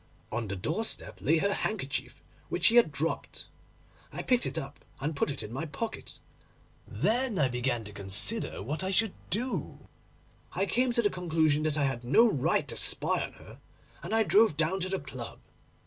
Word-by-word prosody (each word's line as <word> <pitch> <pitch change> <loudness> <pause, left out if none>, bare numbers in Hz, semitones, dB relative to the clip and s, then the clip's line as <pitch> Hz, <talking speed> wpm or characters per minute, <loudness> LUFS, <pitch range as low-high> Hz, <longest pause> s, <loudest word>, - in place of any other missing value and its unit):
On 120 -2 -2
the 100 - -3
doorstep 160 - -3
lay 160 +3 +3
her 200 +5 +2
handkerchief, 190 -13 -3 0.3
which 175 - 0
she 230 - +6
had 235 -10 +6
dropped. 155 +3 -3 0.7
I - - -5
picked 250 -1 +2
it - - -4
up 140 +1 -6 0.2
and 150 +3 -2
put 140 - +1
it 140 - -4
in 105 - -7
my 155 +6 -3
pocket. 225 +9 -5 0.7
Then 215 - +1
I 145 -4 +4
began 125 -1 -1
to 105 -1 -9
consider 100 0 -2
what 150 - -3
I 190 - -1
should 200 +1 +2 0.2
do. 245 +5 -3 0.7
I 195 - +1
came 250 +4 +2
to 235 0 +2
the 205 - +3
conclusion 160 -4 +2
that 155 -1 0
I 145 - +2
had 135 -3 -1
no 220 - +6
right 145 - +1
to - - -3
spy - - +3
on - - -6
her, - - -14 0.4
and 175 - -6
I 225 - +5
drove 215 -6 +4
down 165 +4 +1
to 185 0 -2
the 190 - 0
club. 135 -5 -7
155 Hz, 190 wpm, -30 LUFS, 135-205 Hz, 0.7 s, she